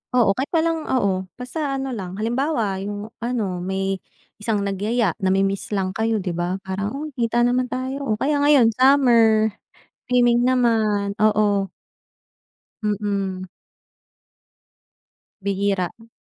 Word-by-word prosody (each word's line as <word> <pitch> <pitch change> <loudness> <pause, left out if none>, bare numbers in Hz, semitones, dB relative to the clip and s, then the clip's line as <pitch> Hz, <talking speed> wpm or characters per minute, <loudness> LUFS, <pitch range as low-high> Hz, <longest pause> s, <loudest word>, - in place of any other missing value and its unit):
Oo, 230 -5 +5
kahit 270 +3 -1
pa 325 -1 +3
lang 325 -1 -1
oo. 195 -7 0
Basta 275 +3 -3
ano 270 0 -3
lang, 190 -6 -5
halimbawa 230 -3 -1
'yong 205 +2 -5
ano, 225 -6 -2
may, 190 +1 -2 0.4
isang 210 -1 -1
nagyaya, 205 +1 0
namimiss 195 +1 +1
ang 190 -1 -1
kayo, 220 +1 0
'di 180 - -2
ba. 175 +2 -2
Parang, 200 +5 -3
"Uy, 305 +1 -5
kita 235 -1 +1
naman 250 +1 +2
tayo" 260 +2 -4
o 215 - +1
kaya 285 +6 0
ngayon 285 -5 +5
summer, 230 -4 +4 0.6
swimming 245 -1 +3
naman, 220 -5 +2
oo. 210 -2 +2 1.1
Mm. 200 -3 -2 1.9
Bihira. 195 -2 0
M 225 0 -18
215 Hz, 125 wpm, -22 LUFS, 195-250 Hz, 1.9 s, Oo